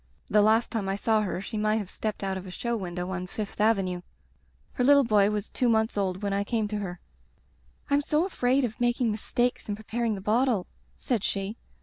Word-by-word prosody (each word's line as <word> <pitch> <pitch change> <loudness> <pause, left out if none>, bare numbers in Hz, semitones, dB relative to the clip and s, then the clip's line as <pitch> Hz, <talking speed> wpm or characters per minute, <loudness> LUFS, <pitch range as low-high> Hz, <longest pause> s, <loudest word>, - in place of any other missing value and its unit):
The 210 - +5
last 220 +3 +3
time 210 -4 -2
I 195 - 0
saw 215 +1 +2
her 190 -3 -2
she 215 +2 -4
might 215 0 +2
have 205 -4 -3
stepped 215 -2 -4
out 195 -1 -1
of 190 0 -6
a - - -7
show 235 +6 -2
window 180 -3 -4
on 185 -1 -3
Fifth 205 +1 -5
Avenue. 195 -5 +2 0.7
Her 250 - 0
little 280 +2 +6
boy 210 -4 +4
was 210 0 -3
two 250 - +1
months 220 0 +2
old 190 -1 -1
when 200 -1 0
I 200 0 +1
came 220 0 -1
to 210 0 -2
her. 180 -3 -5 0.9
Tm 285 +1 +4
so 305 +4 +2
afraid 265 -7 +1
of 235 +1 -6
making 240 -1 +2
mistakes 240 +3 -1
in 205 - 0
preparing 220 +1 -2
the - - -6
bottle,' 220 -1 +2 0.3
said 235 -6 -1
she. 195 +2 -2
215 Hz, 215 wpm, -27 LUFS, 195-235 Hz, 0.9 s, little